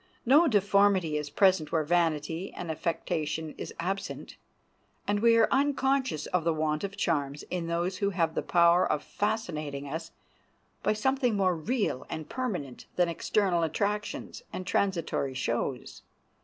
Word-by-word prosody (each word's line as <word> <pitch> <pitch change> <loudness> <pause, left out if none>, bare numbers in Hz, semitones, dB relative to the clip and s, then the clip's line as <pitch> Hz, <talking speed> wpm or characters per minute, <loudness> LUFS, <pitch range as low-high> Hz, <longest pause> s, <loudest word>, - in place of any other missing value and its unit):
No 295 +7 +6
deformity 200 - +3
is 150 -1 -2
present 185 -1 +3
where 160 -2 +2
vanity 165 +1 0
and 170 -2 -4
affectation 160 -1 -2
is - - -6
absent, 195 +3 -4 0.7
and 205 0 +1
we 230 +1 +5
are 225 - +5
unconscious 270 - +1
of 180 -2 0
the 165 -1 +1
want 155 +1 -1
of 200 0 -4
charms 145 -6 -1
in 175 -2 -2
those 175 +3 -1
who 200 0 +1
have 170 -4 0
the - - -1
power 170 0 +4
of 150 - -1
fascinating 155 -10 -3
us 160 +3 -5 0.7
by - - +2
something 250 +1 +1
more 185 -3 +2
real 200 - -1
and 160 -1 -5
permanent 180 - -4
than 175 -1 +2
external 180 +1 +1
attractions 205 - -2
and 185 - -5
transitory 170 -9 0
shows. 125 0 -3
175 Hz, 145 wpm, -29 LUFS, 155-205 Hz, 0.7 s, No